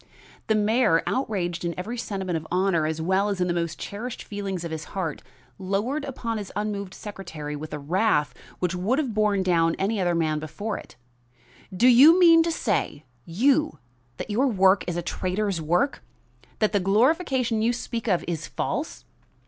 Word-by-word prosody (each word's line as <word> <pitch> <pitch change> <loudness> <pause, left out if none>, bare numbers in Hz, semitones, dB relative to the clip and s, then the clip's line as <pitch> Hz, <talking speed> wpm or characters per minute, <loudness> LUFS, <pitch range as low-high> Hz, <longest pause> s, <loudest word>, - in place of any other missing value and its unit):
The 220 - +3
mayor, 215 -5 +3
outraged 180 -9 -2
in 170 -1 -2
every 215 +7 -4
sentiment 190 -6 -3
of 160 0 -4
honor 180 -3 +2
as 160 0 -3
well 190 +5 +1
as 200 -2 -2
in 180 - +2
the 175 - 0
most 170 -2 -2
cherished 225 +4 -6
feelings 195 -4 -4
of 170 - -5
his 160 -1 -4
heart, 165 -6 -3 0.4
lowered 215 +10 -1
upon 235 -5 -4
his 200 - -7
unmoved 205 -2 -3
secretary 160 -8 -7
with 155 +2 -7
a 150 - -3
wrath 155 +1 +1 0.2
which 180 0 -1
would 190 +9 0
have 275 -7 -1
borne 210 -2 +2
down 165 -2 +2
any 200 +1 0
other 175 -1 +1
man 155 -2 0
before 165 +8 -5
it. - - -14 0.8
"Do 190 +7 +3
you 285 +8 +8
mean 335 -2 +7
to 335 +1 0
say, 195 - -1 0.2
you, 270 - +2 0.4
that - - -5
your 250 +7 +2
work 195 -4 +4
is 175 -1 -2
a 175 - -2
traitor's 185 +1 -2
work? 175 - 0 0.6
That 215 - +1
the 205 - +2
glorification 245 - +2
you 230 +2 +3
speak 235 -1 -5
of 180 -5 +1
is 170 -3 -3
false? - - -4
195 Hz, 180 wpm, -25 LUFS, 175-225 Hz, 0.8 s, you